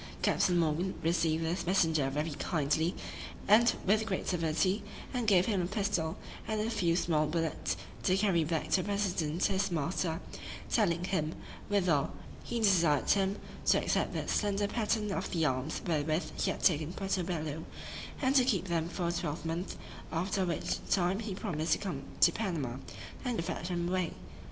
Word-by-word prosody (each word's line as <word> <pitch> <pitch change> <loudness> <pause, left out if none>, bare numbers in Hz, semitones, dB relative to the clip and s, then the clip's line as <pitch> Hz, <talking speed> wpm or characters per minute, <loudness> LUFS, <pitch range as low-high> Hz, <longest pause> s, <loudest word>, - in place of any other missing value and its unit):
Captain 180 -2 +3
Morgan 170 +3 +1
received 165 -1 +2
this 170 +1 -2
messenger 160 -7 +3
very 150 +4 -2
kindly, 155 +2 0 0.5
and 230 +4 +6
with 215 +3 +3
great 190 -3 -2
civility; 180 +3 +1 0.3
and 245 -3 -1
gave 185 -3 +5
him 200 -5 +1
a 175 - -1
pistol, 195 -5 -1 0.3
and 220 -1 -1
a 220 +2 0
few 170 -6 +2
small 155 -3 +2
bullets, 165 0 -1 0.2
to 185 - +2
carry 195 -5 +3
back 155 0 -2
to 185 - +4
the - - -5
president 180 -5 0
his 195 0 +1
master; 165 +1 -1 0.5
telling 175 -6 +2
him, 165 -4 -1 0.3
withal, 180 -8 +2 0.3
"he 235 - -2
desired 170 -9 +4
him 195 0 +2 0.3
to - - +5
accept - - 0
that - - -2
slender 205 -1 +1
pattern 210 -1 0
of - - -2
the 165 -2 +1
arms 130 +2 -1
wherewith 155 0 0
he - - +2
had - - -3
taken 160 -1 +3
Puerto 195 -1 -1
Bello, 160 -3 -3 0.6
and 260 - +3
keep 245 - +4
them 165 -1 0
for 175 0 -2
a - - +1
twelvemonth; 165 +1 -3 0.4
after 185 +3 0
which 170 -3 -1
time 185 +1 +2
he 210 -4 -4
promised 170 -6 0
to - - +2
come 195 -3 -4 0.2
to - - +8
Panama, 160 - -2 0.5
and 240 -10 -1
fetch 175 -1 -3
them 175 -1 -1
away." 180 -2 0
175 Hz, 165 wpm, -32 LUFS, 160-195 Hz, 0.6 s, to